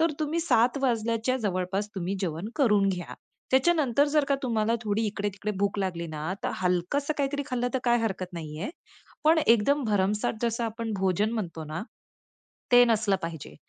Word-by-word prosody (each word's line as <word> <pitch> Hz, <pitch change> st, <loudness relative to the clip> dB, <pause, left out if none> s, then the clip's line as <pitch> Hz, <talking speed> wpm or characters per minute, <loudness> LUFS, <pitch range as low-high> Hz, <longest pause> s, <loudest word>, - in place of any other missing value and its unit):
तर 330 Hz, -1 st, +3 dB
तुम्ही 310 Hz, +2 st, 0 dB
7:00 250 Hz, -5 st, +3 dB
वाजल्याच्या 230 Hz, 0 st, +1 dB
जवळपास 190 Hz, +1 st, -1 dB
तुम्ही 190 Hz, 0 st, -2 dB
जेवण 175 Hz, +2 st, -3 dB
करून 210 Hz, -9 st, +4 dB
घ्या. 180 Hz, -2 st, -4 dB, 0.4 s
त्याच्यानंतर 280 Hz, -1 st, +3 dB
जर 300 Hz, -2 st, +4 dB
का 280 Hz, -, +3 dB
तुम्हाला 230 Hz, -3 st, +1 dB
थोडी 215 Hz, 0 st, 0 dB
इकडे-तिकडे 205 Hz, 0 st, -3 dB
भूक 200 Hz, 0 st, 0 dB
लागली 180 Hz, -3 st, -2 dB
ना, 155 Hz, +3 st, -4 dB
तर -, -, -1 dB
हलकसं 180 Hz, -, 0 dB
काहीतरी 285 Hz, 0 st, 0 dB
खाल्लं 245 Hz, -3 st, -1 dB
तर -, -, +3 dB
काय 240 Hz, -1 st, +4 dB
हरकत 190 Hz, -4 st, -3 dB
नाहीये. 160 Hz, -, -5 dB, 0.5 s
पण 320 Hz, +1 st, +5 dB
एकदम 245 Hz, +6 st, +4 dB
भरमसाठ 210 Hz, 0 st, +1 dB
जसं 235 Hz, 0 st, 0 dB
आपण 225 Hz, 0 st, -3 dB
भोजन 195 Hz, +3 st, +1 dB
म्हणतो 170 Hz, -8 st, -4 dB
ना, 155 Hz, +4 st, -5 dB, 0.9 s
ते 245 Hz, 0 st, +9 dB
नसलं 215 Hz, -4 st, +2 dB
पाहिजे. 165 Hz, -3 st, -6 dB
215 Hz, 160 wpm, -27 LUFS, 185-245 Hz, 0.9 s, ते